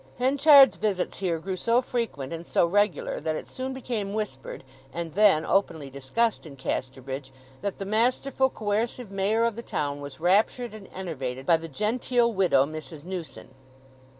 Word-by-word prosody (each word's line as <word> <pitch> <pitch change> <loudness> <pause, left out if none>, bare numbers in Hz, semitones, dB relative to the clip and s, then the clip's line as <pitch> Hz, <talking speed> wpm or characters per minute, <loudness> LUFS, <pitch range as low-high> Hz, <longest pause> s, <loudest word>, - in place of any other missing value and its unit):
Henchard's 275 +2 +6
visits 200 -4 -1
here 180 -4 0
grew 185 +4 -4
so 230 +6 +2
frequent 230 - -3
and 165 +1 -7
so - - +3
regular 205 +2 +1
that 160 -1 -2
it - - -6
soon 260 +1 -5
became 230 -6 -4
whispered, 195 -15 -5 0.3
and 165 +1 -5
then 195 -6 +4
openly 160 -8 0
discussed 140 - -1
in 140 - -11
Casterbridge 130 0 -4 0.3
that 200 -1 -3
the 195 - -5
masterful, 250 +5 +1
coercive 220 +1 -2
Mayor 200 +4 +1
of 230 -2 0
the 235 - -5
town 145 -9 -3
was 140 0 -9
raptured 210 +7 +2
and 215 -3 -11
enervated 135 -8 -5
by 165 +1 +5
the 165 0 -8
genteel 235 - +1
widow 180 -9 +4
Mrs. 155 0 -8
Newson. 180 -2 -7
195 Hz, 160 wpm, -26 LUFS, 155-230 Hz, 0.3 s, Henchard's